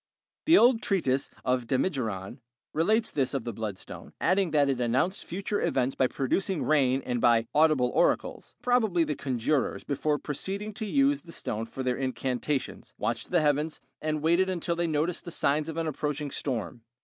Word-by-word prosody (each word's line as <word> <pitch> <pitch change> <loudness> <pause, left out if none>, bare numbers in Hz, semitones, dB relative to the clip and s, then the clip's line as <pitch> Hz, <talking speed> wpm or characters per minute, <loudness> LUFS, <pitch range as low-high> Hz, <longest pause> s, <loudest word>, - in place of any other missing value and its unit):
The 330 +3 +7
old 240 -1 +5
treatise 140 - 0 0.2
of 125 -2 0
Damigeron 125 - -2 0.3
relates 215 +8 +2
this 135 -2 0
of 135 - -1
the 120 - -4
bloodstone, 105 -3 -7
adding 185 +1 +2
that 145 -2 +3
it 135 -2 0
announced 130 +11 +1
future 195 +3 -3
events 130 0 +1
by 130 - +2
producing 170 +8 -1
rain 135 -3 +2
and 120 -2 -1
by 115 -2 +4
"audible 150 -5 +4
oracles." - - 0
Probably 220 -9 +3
the 150 -1 -1
conjurors, 135 +1 -1
before 145 +1 0
proceeding 195 +9 -4
to 220 0 -5
use 275 +4 +2
the 170 - -13
stone 115 -7 -4
for 130 - -6
their 125 -1 0
incantations, 130 +2 -3
watched - - -2
the 175 -2 +3
heavens 150 +1 +1 0.2
and 155 -1 -2
waited 170 +4 +3
until 170 -1 -1
they 170 0 0
noticed 160 +3 -1
the - - -7
signs 150 -1 0
of 160 - -6
an 165 - -1
approaching 150 -1 -3
storm. 115 - -3
150 Hz, 175 wpm, -28 LUFS, 130-175 Hz, 0.3 s, The